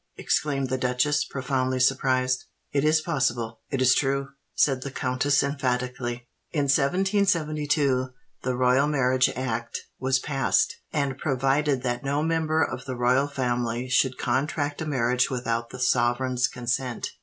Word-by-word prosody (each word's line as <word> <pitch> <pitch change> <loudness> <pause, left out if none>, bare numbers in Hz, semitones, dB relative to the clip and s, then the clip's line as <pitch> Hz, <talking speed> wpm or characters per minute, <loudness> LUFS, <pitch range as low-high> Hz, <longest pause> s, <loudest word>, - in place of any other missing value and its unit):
exclaimed 135 -3 0
the 130 0 -1
duchess, 130 +4 +1
profoundly 130 -1 -2
surprised. 130 -1 +1 0.3
"It 140 -1 +1
is 155 +1 +3
possible—it 120 -2 -2
is 130 0 +6
true!" 140 0 0 0.3
said 135 -3 +2
the 140 - -4
countess 130 +2 +1
emphatically. 125 -3 -2 0.2
"In 150 -3 0
1772 150 -4 +1 0.3
the 130 -1 -1
Royal 130 +3 +3
Marriage 130 -3 +2
Act 120 -2 -3 0.2
was 130 0 +2
passed, 135 +8 +1 0.2
and 140 -3 -1
provided 135 0 +1
that 120 +1 -2
no 140 +2 0
member 160 -1 +1
of 125 -1 -4
the 130 -2 -4
Royal 125 +3 +2
Family 125 -3 -2
should 125 0 +2
contract 145 +4 -1
a 160 - -3
marriage 125 -3 +1
without 115 -2 -2
the - - -9
sovereign's 125 0 +1
consent. 125 0 -3
130 Hz, 135 wpm, -25 LUFS, 125-145 Hz, 0.3 s, is